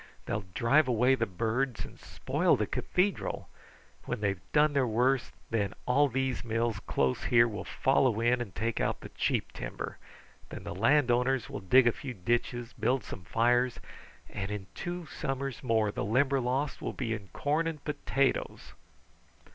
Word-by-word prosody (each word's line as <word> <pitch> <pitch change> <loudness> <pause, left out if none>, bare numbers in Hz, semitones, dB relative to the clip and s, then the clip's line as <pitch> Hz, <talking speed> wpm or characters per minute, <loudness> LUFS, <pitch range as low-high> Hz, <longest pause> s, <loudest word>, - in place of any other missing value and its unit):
They'll 100 -1 -3
drive 140 +5 +4
away 125 +2 +4
the 115 -3 +1
birds 115 +6 -1
and - - -13
spoil - - +1
the - - 0
cathedral. 190 +2 -1 0.6
When - - -3
they 100 -1 +1
have 95 -1 -7
done 150 0 +4
their 135 -3 +2
worst, 125 +3 +1 0.2
then 105 -3 0
all 145 +4 +4
these 130 -1 -1
mills 115 -1 -1
close 65 -1 0
here 115 -1 +5
will 105 -2 -5
follow 130 -4 +2
in 120 +1 +2
and 100 -7 -6
take 115 +3 -1
out - - -1
the - - -8
cheap - - -1
timber. - - -6 0.5
Then - - -8
the - - -5
landowners 125 +3 +2
will - - -4
dig 120 +7 +5
a 120 - +5
few 130 +1 -7
ditches, 120 +4 -1
build 120 +2 0
some 90 - -8
fires, 120 +4 +2 0.5
and 95 0 -5
in 105 -2 -4
two 175 -1 -5
summers 135 -2 -4
more 110 -4 +2
the - - -3
Limberlost 130 +4 +1
will - - -3
be 115 -4 -2
in 105 -3 -6
corn 150 - 0
and 155 -3 -5
potatoes." 140 -2 -1
120 Hz, 165 wpm, -30 LUFS, 110-135 Hz, 0.6 s, here